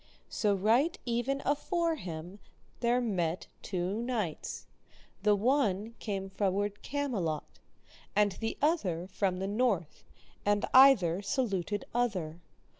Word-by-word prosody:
So 205 -2 +1
right 230 - +2
even 245 +3 -1
afore 335 +4 +1
him 180 - -7 0.4
there 240 +1 +2
met 180 -8 -1 0.2
two 190 +3 -2
knights, 225 -10 -3 0.6
the 210 +1 +4
one 220 -2 +1
came 195 -3 -3
froward 200 +1 -1
Camelot, 215 - -3 0.6
and 205 0 +4
the 225 +4 -4
other 190 - +1
from 190 -1 -1
the 190 +1 -2
north, 205 -6 0 0.4
and 205 0 +2
either 220 -10 +7
saluted 205 -3 -1
other. 185 -10 -1
205 Hz, 115 wpm, -31 LUFS, 185-245 Hz, 0.6 s, either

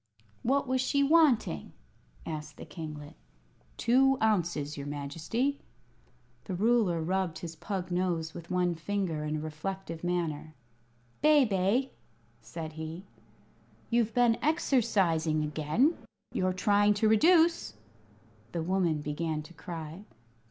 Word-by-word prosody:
"What 275 +3 +1
was 260 0 +1
she 280 +2 +2
wanting?" 280 - +3 0.5
asked 150 -2 -6
the - - -9
kinglet. 150 -3 -8 0.6
"Two 270 +3 +4
ounces, 175 -9 0
your 140 0 -6
Majesty." 165 - -2 0.9
The 190 - -4
ruler 205 -5 +2
rubbed 185 -1 -1
his 165 -1 -7
pug 185 +1 -4
nose 175 -3 -1
with 170 -1 -9
one 180 -1 +1
finger, 170 -2 -2
in 150 0 -2
a - - -2
reflective 165 +2 -5
manner. 160 -3 -2 0.7
"Bebe," 255 -4 +3 0.5
said 160 +2 -7
he, 160 +4 -7 0.9
"you've 230 -2 +1
been 240 -2 +4
exercising 190 - +2
again. 155 - +1 0.4
You're 185 0 +1
trying 205 +2 +3
to 215 +2 +2
reduce!" 325 - +4 0.8
The 170 - -2
woman 170 -4 +1
began 155 +1 -2
to 175 - -14
cry. 165 +1 -7
180 Hz, 115 wpm, -30 LUFS, 160-225 Hz, 0.9 s, Two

